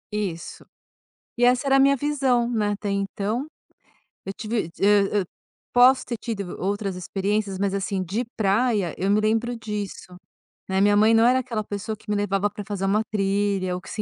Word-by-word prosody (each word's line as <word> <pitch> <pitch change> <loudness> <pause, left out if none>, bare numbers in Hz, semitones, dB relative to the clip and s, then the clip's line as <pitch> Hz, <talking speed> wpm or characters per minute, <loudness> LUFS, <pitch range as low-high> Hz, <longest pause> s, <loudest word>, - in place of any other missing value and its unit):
Isso. 185 -6 -4 0.7
E 245 - +2
essa 250 +3 +3
era 270 - +3
a - - +5
minha 275 +1 +5
visão, 265 -4 +1
né, 215 -3 0
até 205 0 -3
então. 200 +6 -2 0.8
Eu 195 - -5
tive 215 -6 -3
hã 205 0 +4
hã, - - -2 0.5
posso 255 +2 +6
ter 235 - -3
tido 200 -5 -5
outras 200 0 -2
experiências, 195 +2 -2
mas 200 0 -1
assim, 195 -1 -2
de 205 +8 -2
praia, 205 -3 +1
eu 190 +2 -1
me 210 +1 +4
lembro 225 +3 0
disso, 205 -4 -6 0.5
né. 190 0 +1
Minha 205 0 +4
mãe 220 +2 +5
não 225 0 +5
era 255 +1 +5
aquela 230 -4 -3
pessoa 205 +2 -5
que 210 - -17
me 210 - +1
levava 205 0 0
pra 205 - -8
fazer 195 -2 -3
uma 210 +3 +2
trilha 195 -2 0
ou 180 - -6
que 150 - -13
se 215 - -3
205 Hz, 190 wpm, -24 LUFS, 195-230 Hz, 0.8 s, posso